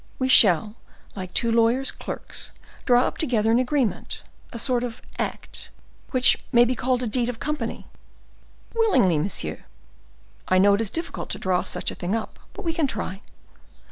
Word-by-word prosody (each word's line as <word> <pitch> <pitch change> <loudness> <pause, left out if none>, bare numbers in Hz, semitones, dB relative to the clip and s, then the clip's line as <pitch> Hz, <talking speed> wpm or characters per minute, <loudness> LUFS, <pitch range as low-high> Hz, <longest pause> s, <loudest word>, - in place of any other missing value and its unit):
We 260 0 -1
shall, 210 -1 +6 0.4
like 185 -2 -6
two 230 +4 +1
lawyers' 235 +4 +2
clerks, - - -7 0.4
draw 245 -1 +5
up - - -3
together 225 -7 +1
an 235 - +4
agreement, 255 -3 -1 0.3
a - - -6
sort 245 0 +1
of 245 -1 -5 0.2
act, - - -5 0.4
which 255 -2 +3
may 240 -1 +6
be 250 - 0
called 255 +1 0
a - - -1
deed 240 +2 +1
of 240 - -5
company." 300 0 -4 0.9
"Willingly, 395 - +3
monsieur." 195 +7 -3 0.8
"I 185 - +3
know 200 +2 +5
it 200 - +1
is 220 - -1
difficult 330 - -5
to - - -3
draw 185 -1 0
such - - -2
a - - -8
thing 185 +4 -2
up, 225 - -5
but - - -9
we 330 - 0
can 320 -3 +1
try." 195 -6 -4
235 Hz, 170 wpm, -24 LUFS, 205-255 Hz, 0.9 s, shall